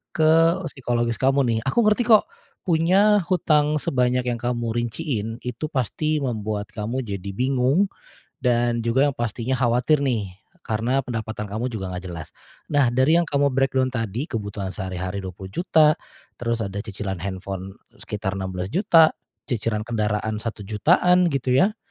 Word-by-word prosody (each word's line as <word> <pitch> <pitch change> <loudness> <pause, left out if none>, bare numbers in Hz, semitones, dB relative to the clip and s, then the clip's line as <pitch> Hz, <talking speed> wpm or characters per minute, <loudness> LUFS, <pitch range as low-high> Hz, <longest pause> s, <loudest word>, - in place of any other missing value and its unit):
ke 165 +3 +4
psikologis 120 -3 -1
kamu 135 +1 +3
nih. 115 -2 +1
Aku 235 - +3
ngerti 215 +2 +2
kok 220 - +5 0.3
punya 190 +5 +4
hutang 150 -5 +2
sebanyak 125 -3 +1
yang 120 -1 -2
kamu 120 -1 -2
rinciin, 120 -1 -2
itu 125 +5 -4
pasti 150 +2 -1
membuat 105 -4 -3
kamu 115 +5 -3
jadi 100 -3 -5
bingung. 135 - +2 0.5
Dan 120 -1 +1
juga 125 +4 +3
yang 140 - -1
pastinya 120 +2 -2
khawatir 125 +3 +2
nih, 115 -9 -1 0.3
karena 120 +4 0
pendapatan 110 -3 -4
kamu 110 +5 -3
juga 95 -6 -5
nggak 90 +1 -6
jelas. 80 -3 -8 0.4
Nah, 145 -3 +4
dari 130 +8 +3
yang 170 - -2
kamu 140 -1 +2
breakdown 130 0 +1
tadi, 115 +2 -2
kebutuhan 100 - -4
sehari-hari 95 +1 -4
Rp20.000.000, 95 - +2 0.5
terus 115 -1 -1
ada 100 +1 -4
cicilan 100 -3 -5
handphone 95 +1 -6 0.2
sekitar 100 -2 -4
Rp16.000.000, 95 - +3 0.3
cicilan 110 -4 -2
kendaraan 105 -1 -1
Rp1.000.000-an 150 - +2
gitu 135 -4 -1
ya. 190 +11 +3
120 Hz, 140 wpm, -23 LUFS, 105-145 Hz, 0.5 s, kok